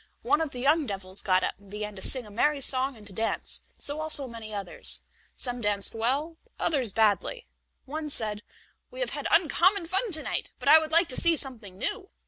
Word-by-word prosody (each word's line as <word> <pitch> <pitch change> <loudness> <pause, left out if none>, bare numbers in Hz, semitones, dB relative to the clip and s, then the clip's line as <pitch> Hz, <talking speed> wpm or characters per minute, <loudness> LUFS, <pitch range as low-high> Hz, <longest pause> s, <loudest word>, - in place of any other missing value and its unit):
One 310 - +2
of 320 - -1
the 255 - -10
young 290 +3 +2
devils 190 -2 -4
got 185 -1 +2
up - - -2
and 200 -1 -19
began 210 +1 -5
to 190 - -7
sing 255 +2 0
a 210 - -13
merry 290 +7 +1
song 265 -1 +2
and 210 - -15
to 200 - -8
dance; 225 +3 -2 0.2
so 290 +2 -2
also 305 -3 +4
many 230 -2 -9
others; 200 -3 -3 0.3
some 245 -1 0
danced 205 -2 +2
well, 275 +9 -1 0.2
others 270 -9 +1
badly. 220 - +1 0.4
One 305 +2 -5
said: 215 -6 0 0.5
"We - - -11
have - - -1
had - - -3
uncommon 345 +3 +3
fun 385 +7 -1
to 310 -1 +4
night, - - -3
but 250 - -8
I 315 - +9
would 315 0 -5
like 335 +2 +5
to 255 - 0
see 335 -2 +4
something 225 -10 -3
new." 385 - -4
260 Hz, 210 wpm, -27 LUFS, 210-315 Hz, 0.5 s, I